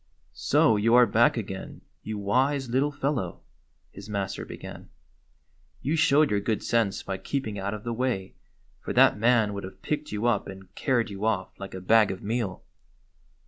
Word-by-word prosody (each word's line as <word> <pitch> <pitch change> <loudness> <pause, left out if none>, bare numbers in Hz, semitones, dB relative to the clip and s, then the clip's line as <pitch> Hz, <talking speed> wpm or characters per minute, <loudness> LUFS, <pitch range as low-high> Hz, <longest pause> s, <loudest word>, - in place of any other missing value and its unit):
"So 110 - +3
you 115 +3 +3
are 125 0 +8
back 115 +3 +3
again, 95 -3 -6 0.2
you 110 0 -5
wise 130 +6 +1
little 135 +4 +2
fel 145 0 -1
low?" 95 - -4 0.5
his 100 +2 -11
master 100 -2 -3
began. - - -10 0.9
"You 150 +4 0
showed 155 -2 +4
your 105 - +2
good 110 +1 -2
sense 115 -4 0
by 95 -1 -4
keeping 110 -2 -3
out 100 +2 -3
of 105 - -9
the 120 - -3
way, 115 -6 -2 0.5
for - - -5
that - - +6
man 115 -2 +3
would 100 - -5
have 95 - -10
picked 150 0 -3
you 105 +2 -2
up 120 -4 +1
and 95 0 -11
carried 120 -6 0
you 100 +1 -7
off 100 -4 0
like 95 -1 -7
a 95 - -6
bag 110 +2 +4
of 95 - -5
meal." 110 -3 -2
110 Hz, 185 wpm, -27 LUFS, 100-125 Hz, 0.9 s, are